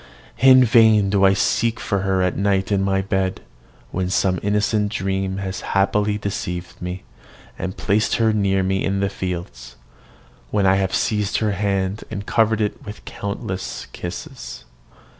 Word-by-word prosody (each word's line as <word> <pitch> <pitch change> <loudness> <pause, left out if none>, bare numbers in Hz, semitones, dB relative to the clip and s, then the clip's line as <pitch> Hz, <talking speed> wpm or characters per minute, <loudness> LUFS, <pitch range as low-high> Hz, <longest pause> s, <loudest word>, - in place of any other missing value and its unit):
In 130 0 +7
vain 110 -4 +5
do 100 -1 +2
I 95 - +6
seek 115 +3 +1
for 100 -3 -1
her 95 -1 +1
at 90 - 0
night 100 0 0
in 100 -1 +2
my 95 0 +1
bed, 95 -1 -1 0.5
when 90 0 -2
some 95 -1 +1
innocent 105 0 +1
dream 95 -1 -2
has 95 -1 -4
happily 105 +1 +1
deceived 90 -4 -5
me, 90 +1 -5 0.6
and 95 0 -4
placed 105 +2 +1
her 110 -1 +2
near 95 -2 +1
me 95 +1 0
in 100 0 0
the 100 0 +1
fields, 85 -11 -6 0.7
when 100 +6 +1
I 95 0 +4
have 95 -1 0
seized 105 -2 0
her 110 -1 0
hand 100 0 -1
and 105 -2 -5
covered 110 -1 +2
it 105 - -2
with 105 +1 -10
countless 95 -2 -5
kisses. - - -7
100 Hz, 160 wpm, -21 LUFS, 95-105 Hz, 0.7 s, In